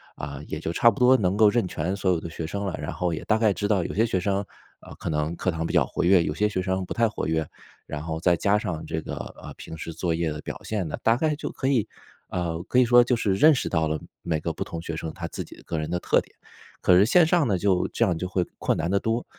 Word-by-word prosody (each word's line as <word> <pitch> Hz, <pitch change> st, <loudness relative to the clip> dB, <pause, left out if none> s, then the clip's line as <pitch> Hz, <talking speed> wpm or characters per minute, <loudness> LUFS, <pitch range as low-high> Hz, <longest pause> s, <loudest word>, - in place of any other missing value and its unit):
啊， 70 Hz, 0 st, -6 dB
也 75 Hz, -, -4 dB
就 80 Hz, +1 st, -3 dB
差 115 Hz, -, +5 dB
不 100 Hz, -, -3 dB
多 125 Hz, +1 st, +6 dB
能 95 Hz, -3 st, +1 dB
够 110 Hz, -1 st, +6 dB
认 115 Hz, -6 st, +1 dB
全 90 Hz, +4 st, -2 dB
所 95 Hz, -2 st, +1 dB
有 85 Hz, -, +1 dB
的 85 Hz, -, -7 dB
学 80 Hz, -1 st, -5 dB
生 100 Hz, +3 st, -3 dB
了。 95 Hz, -, -2 dB
然 -, -, -4 dB
后 90 Hz, -2 st, -1 dB
也 80 Hz, -, -4 dB
大 110 Hz, -, +3 dB
概 110 Hz, -3 st, +3 dB
知 100 Hz, -, -2 dB
道 100 Hz, -4 st, +2 dB
有 -, -, -4 dB
些 110 Hz, +4 st, +2 dB
学 95 Hz, -, 0 dB
生， 100 Hz, +2 st, 0 dB, 0.4 s
呃， -, -, -12 dB
可 -, -, -8 dB
能 75 Hz, +1 st, -1 dB
课 90 Hz, -, -1 dB
堂 80 Hz, 0 st, -3 dB
比 -, -, -3 dB
较 -, -, +3 dB
活 -, -, -3 dB
跃， 90 Hz, -1 st, +5 dB
有 75 Hz, -, -2 dB
些 105 Hz, +5 st, +1 dB
学 95 Hz, -, -2 dB
生 95 Hz, 0 st, -1 dB
不 -, -, -6 dB
太 115 Hz, -2 st, +3 dB
活 110 Hz, -, -4 dB
跃。 80 Hz, -1 st, 0 dB, 0.4 s
然 75 Hz, -, -5 dB
后 80 Hz, 0 st, -4 dB
再 85 Hz, +1 st, +3 dB
加 100 Hz, +5 st, +2 dB
上 90 Hz, -6 st, -3 dB
这 80 Hz, -1 st, -3 dB
个， -, -, -6 dB, 0.3 s
呃， -, -, -9 dB
平 80 Hz, -, -9 dB
时 80 Hz, +1 st, -6 dB
作 85 Hz, 0 st, -1 dB
业 80 Hz, -2 st, -1 dB
的 75 Hz, +1 st, -6 dB
表 -, -, -6 dB
现 105 Hz, -5 st, -2 dB
呢， -, -, -4 dB
大 115 Hz, +1 st, +4 dB
概 155 Hz, +2 st, 0 dB
就 150 Hz, -, -5 dB
可 130 Hz, -, -3 dB
以， 120 Hz, -6 st, +2 dB, 0.4 s
呃， 85 Hz, -2 st, -2 dB
可 125 Hz, +7 st, +2 dB
以 125 Hz, -, +6 dB
说 120 Hz, 0 st, +7 dB
就 125 Hz, 0 st, +1 dB
是 100 Hz, -4 st, 0 dB
认 155 Hz, +9 st, +6 dB
识 130 Hz, -, -1 dB
到 80 Hz, -1 st, +1 dB
了 80 Hz, -1 st, -1 dB, 0.2 s
每 80 Hz, -2 st, -1 dB
个 85 Hz, -, -2 dB
不 -, -, -4 dB
同 85 Hz, -1 st, -6 dB
学 85 Hz, -1 st, -5 dB
生 80 Hz, 0 st, -5 dB
他 -, -, -5 dB
自 -, -, -5 dB
己 -, -, -14 dB
个 80 Hz, -, -4 dB
人 75 Hz, +2 st, -3 dB
的 90 Hz, -, 0 dB
特 -, -, +3 dB
点。 -, -, -21 dB, 0.5 s
可 90 Hz, -, +5 dB
是 100 Hz, -, +6 dB
线 170 Hz, +8 st, +5 dB
上 165 Hz, -4 st, +2 dB
呢 100 Hz, -, +1 dB
就 95 Hz, 0 st, +1 dB
这 115 Hz, -, +2 dB
样 90 Hz, -6 st, +1 dB
就 90 Hz, -, -3 dB
会 90 Hz, -1 st, 0 dB
困 -, -, 0 dB
难 85 Hz, +2 st, -1 dB
得 100 Hz, -, +3 dB
多。 115 Hz, +2 st, -1 dB
90 Hz, 320 characters per minute, -25 LUFS, 80-110 Hz, 0.5 s, 说